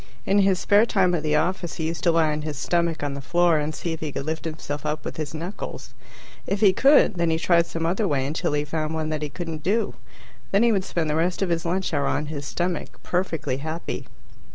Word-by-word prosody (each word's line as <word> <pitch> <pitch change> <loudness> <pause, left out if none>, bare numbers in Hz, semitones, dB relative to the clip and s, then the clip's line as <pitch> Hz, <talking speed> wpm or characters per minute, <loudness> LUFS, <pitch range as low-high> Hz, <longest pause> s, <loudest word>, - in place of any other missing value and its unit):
In 200 +1 +3
his 195 -1 +4
spare 205 +5 +4
time 185 -5 +3
at 170 - +1
the 150 0 +1
office, 175 +1 0
he 160 - -3
used 165 +1 -3
to 170 - +6
lie 165 -2 +3
on 150 0 -2
his 150 -2 -4
stomach 170 0 0
on 145 -1 -1
the 140 - -5
floor 170 +2 +3
and 150 +1 -2
see 170 - -3
if 160 - -6
he 155 -2 -4
could 135 - -4
lift 160 +1 -3
himself 155 -2 -5
up 150 0 -3
with - - -5
his 155 0 -4
knuckles. 175 +6 -6 0.5
If 200 - 0
he 200 -3 +6
could, 270 -4 +5
then 170 -1 +2
he 160 - +2
tried 170 0 +3
some 165 0 -3
other 190 +5 +1
way 135 -5 0
until 150 +1 -1
he 145 0 0
found 155 +1 -2
one 155 -1 -2
that 155 -1 -2
he 150 - -3
couldn't 165 0 -5
do. 210 +8 0 0.6
Then 200 +3 +3
he 235 - +5
would 195 -3 +1
spend 165 -2 -1
the 150 - 0
rest 175 +4 +1
of 190 - -1
his 170 0 0
lunch 185 0 -1
hour 140 -2 +1
on 150 - 0
his 145 -1 -5
stomach, 175 -8 -3
perfectly 170 -7 -1
happy. 160 +4 -5
165 Hz, 245 wpm, -24 LUFS, 150-180 Hz, 0.6 s, to